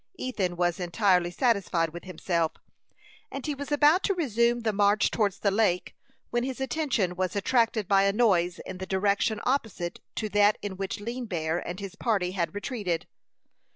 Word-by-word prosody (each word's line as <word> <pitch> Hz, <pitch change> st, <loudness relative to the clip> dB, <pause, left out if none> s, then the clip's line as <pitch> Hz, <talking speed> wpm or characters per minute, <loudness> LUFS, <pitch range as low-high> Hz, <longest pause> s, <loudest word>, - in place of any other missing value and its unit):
Ethan 200 Hz, -, -2 dB
was 175 Hz, 0 st, 0 dB
entirely 180 Hz, 0 st, +2 dB
satisfied 185 Hz, -6 st, +1 dB
with 175 Hz, +2 st, -9 dB
himself, 170 Hz, -2 st, -1 dB, 0.8 s
and 275 Hz, -, -5 dB
he 300 Hz, -, -1 dB
was 285 Hz, +1 st, -7 dB
about 295 Hz, +5 st, +5 dB
to 395 Hz, -, +1 dB
resume 240 Hz, -, +1 dB
the 220 Hz, -2 st, 0 dB
march 205 Hz, +1 st, +3 dB
towards 200 Hz, -3 st, 0 dB
the 200 Hz, -, +1 dB
lake, 195 Hz, -4 st, +1 dB, 0.4 s
when 240 Hz, 0 st, +1 dB
his 260 Hz, 0 st, -4 dB
attention 260 Hz, -, 0 dB
was 185 Hz, +2 st, -2 dB
attracted 225 Hz, 0 st, +1 dB
by 195 Hz, -1 st, +4 dB
a 200 Hz, -, +4 dB
noise 185 Hz, -6 st, +2 dB
in 185 Hz, -1 st, -7 dB
the 190 Hz, -, -5 dB
direction 200 Hz, +3 st, +1 dB
opposite 220 Hz, -10 st, -1 dB, 0.2 s
to 215 Hz, -, -2 dB
that 205 Hz, 0 st, +4 dB
in 200 Hz, -2 st, -4 dB
which 195 Hz, +1 st, -4 dB
Lean 235 Hz, +3 st, -5 dB
Bear 160 Hz, -3 st, -1 dB
and 175 Hz, +2 st, -6 dB
his 195 Hz, -2 st, -6 dB
party 200 Hz, -7 st, 0 dB
had 185 Hz, 0 st, -2 dB
retreated. 205 Hz, -7 st, -2 dB
205 Hz, 175 wpm, -27 LUFS, 180-235 Hz, 0.8 s, about